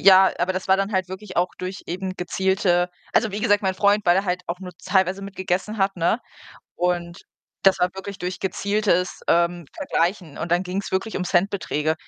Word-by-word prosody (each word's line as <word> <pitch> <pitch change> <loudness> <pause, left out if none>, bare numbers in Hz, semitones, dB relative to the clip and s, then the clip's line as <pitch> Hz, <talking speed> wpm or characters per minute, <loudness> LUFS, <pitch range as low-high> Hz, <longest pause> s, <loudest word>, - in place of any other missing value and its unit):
ja, 190 -1 +7
aber 180 +2 +1
das 185 +1 -4
war 190 - +6
dann 195 +2 -1
halt 185 -1 0
wirklich 190 +1 -8
auch 175 +1 +3
durch 185 +2 -5
eben 185 +2 -4
gezielte 180 0 +1 0.2
also, 220 -2 +2
wie 205 - -3
gesagt, 205 -3 +3
mein 190 -1 +1
Freund, 205 +1 +3
weil 175 +1 +6
er 195 - +1
halt 180 0 -1
auch 175 +2 -4
nur 180 -1 -7
teilweise 190 0 +2
mit 195 -1 -8
gegessen 190 +3 -2
hat, 195 -1 +1
ne? 175 +6 +2 0.6
Und 175 -1 -1 0.4
das 195 -1 +6
war 180 - +3
wirklich 190 +1 -7
durch 180 0 -4
gezieltes, 195 -1 0
ähm, 170 -1 +2
Vergleichen 170 -3 -1
und 165 - -4
dann 175 +2 +2
ging's 190 +2 -3
wirklich 195 +4 -1
um 190 - -1
Centbeträge. 175 -4 +1
190 Hz, 200 wpm, -23 LUFS, 180-195 Hz, 0.6 s, ja